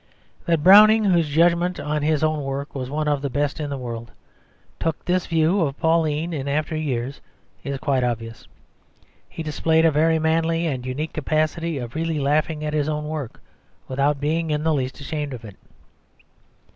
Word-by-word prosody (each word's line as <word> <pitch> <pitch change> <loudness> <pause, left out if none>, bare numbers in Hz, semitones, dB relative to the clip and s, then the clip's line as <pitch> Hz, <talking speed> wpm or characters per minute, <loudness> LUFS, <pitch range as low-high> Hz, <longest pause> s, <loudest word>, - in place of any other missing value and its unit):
That 165 -3 +1
Browning, 215 +4 +8
whose 170 -6 +2
judgment 170 +3 +2
on 150 +1 -2
his 155 0 +1
own 155 -1 +1
work 135 +1 -4
was 130 -2 -5
one 150 +2 -2
of 145 -2 +1
the 140 - -2
best 145 +3 -1
in 150 -2 -3
the 140 - -3
world, 120 -2 -6 0.7
took 165 -1 -2
this 180 0 0
view 165 +4 +2
of 140 -4 -1
Pauline 160 0 +1
in 140 -3 -4
after 150 +2 -1
years 135 -3 -3 0.4
is 140 -1 -3
quite 135 -2 0
obvious. 115 -2 -4 0.8
He 165 - -6
displayed 160 +2 +2
a 165 - +5
very 160 +2 +3
manly 165 +1 +1
and 130 -5 -3
unique 150 +5 -4
capacity 155 +2 -1
of 120 -3 -6
really 165 0 -2
laughing 150 +2 0
at 150 - -3
his 150 0 0
own 150 0 -3
work 150 -6 -6 0.5
without 140 +2 0
being 160 +3 -1
in 150 0 -1
the 160 0 +2
least 130 -2 -2
ashamed 145 -1 -4
of 115 -2 -11
it. 100 -3 -10
150 Hz, 180 wpm, -23 LUFS, 140-160 Hz, 0.8 s, Browning